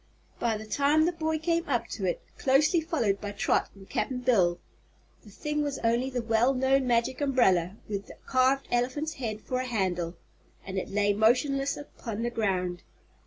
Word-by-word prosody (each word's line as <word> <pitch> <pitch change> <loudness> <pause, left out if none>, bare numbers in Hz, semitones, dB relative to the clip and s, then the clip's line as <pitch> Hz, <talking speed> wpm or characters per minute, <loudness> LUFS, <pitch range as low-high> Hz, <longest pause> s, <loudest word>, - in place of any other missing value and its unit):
By 230 -2 0
the 215 - -8
time 285 +7 +3
the 345 - +2
boy 320 -2 -1
came 335 +1 -1
up 235 -4 0
to 200 - -4
it, 175 - -1 0.2
closely 305 +6 +3
followed 235 -12 0
by 205 -1 -5
Trot 200 - +1
and 195 -1 -14
Cap'n 255 -2 -2
Bill, 190 -9 +3 0.7
the 215 - -14
thing 300 +8 -3
was 285 -2 -2
only 235 +3 +2
the 250 -2 -3
well 230 +4 +2
known 265 0 +2
Magic 240 +3 +1
Umbrella, 200 -10 +2
with 200 -1 -4
the - - -11
carved 260 +1 +2
elephant's 260 +6 0
head 215 -3 -3
for 255 +3 -2
a 255 - -2
handle, 180 -7 -1 0.5
and 190 0 -2
it - - -6
lay 205 0 +2
motionless 275 +6 +2
upon 230 -6 -6
the 240 - -1
ground. 185 -6 -1
240 Hz, 180 wpm, -28 LUFS, 205-275 Hz, 0.7 s, time